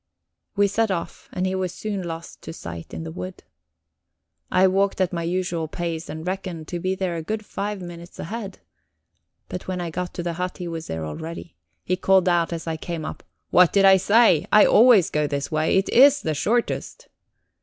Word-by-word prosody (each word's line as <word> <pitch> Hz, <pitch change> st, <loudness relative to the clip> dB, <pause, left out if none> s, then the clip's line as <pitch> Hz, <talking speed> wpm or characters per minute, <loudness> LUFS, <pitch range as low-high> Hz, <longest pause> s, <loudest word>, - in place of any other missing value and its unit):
We 205 Hz, 0 st, +4 dB
set 220 Hz, +2 st, +1 dB
off, 175 Hz, -3 st, -4 dB
and 185 Hz, -, -2 dB
he 185 Hz, -, -1 dB
was 185 Hz, -2 st, -1 dB
soon 205 Hz, 0 st, -4 dB
lost 165 Hz, -1 st, -7 dB
to -, -, -8 dB
sight 85 Hz, -, -8 dB
in -, -, -6 dB
the 160 Hz, -, -6 dB
wood. 185 Hz, +2 st, -7 dB, 1.1 s
I 185 Hz, +1 st, +4 dB
walked 195 Hz, +1 st, +2 dB
at 185 Hz, -1 st, +1 dB
my 170 Hz, -, -2 dB
usual 170 Hz, -1 st, -2 dB
pace, 165 Hz, 0 st, -4 dB
and 160 Hz, +1 st, -6 dB
reckoned 180 Hz, -4 st, -4 dB
to 175 Hz, -, -3 dB
be 185 Hz, +2 st, -1 dB
there 185 Hz, -2 st, -2 dB
a -, -, -3 dB
good 215 Hz, +6 st, -4 dB
five 205 Hz, -2 st, -4 dB
minutes 175 Hz, 0 st, -10 dB
ahead. 205 Hz, +2 st, -6 dB, 0.9 s
But 180 Hz, -, -7 dB
when 185 Hz, -1 st, -3 dB
I 170 Hz, -2 st, -4 dB
got 180 Hz, +2 st, -4 dB
to 175 Hz, -, -3 dB
the 170 Hz, -1 st, -2 dB
hut 180 Hz, +2 st, -4 dB
he 180 Hz, -, -5 dB
was 165 Hz, -1 st, -5 dB
there 80 Hz, -1 st, -4 dB
already. 160 Hz, -, -7 dB, 0.3 s
He 185 Hz, -, -1 dB
called 190 Hz, 0 st, +3 dB
out 175 Hz, -1 st, +2 dB
as 165 Hz, -1 st, -4 dB
I 165 Hz, -1 st, -3 dB
came 165 Hz, -1 st, -5 dB
up: -, -, -6 dB, 0.3 s
"What 180 Hz, -2 st, +6 dB
did 195 Hz, -1 st, +4 dB
I 190 Hz, 0 st, +8 dB
say? 205 Hz, -4 st, +4 dB
I 210 Hz, -, +7 dB
always 225 Hz, -5 st, +6 dB
go 150 Hz, -1 st, +1 dB
this 140 Hz, -1 st, -3 dB
way 155 Hz, +3 st, +2 dB
it 190 Hz, -, +1 dB
is 280 Hz, +3 st, +6 dB
the 155 Hz, -, 0 dB
shortest." 240 Hz, -, -1 dB
180 Hz, 205 wpm, -23 LUFS, 165-195 Hz, 1.1 s, I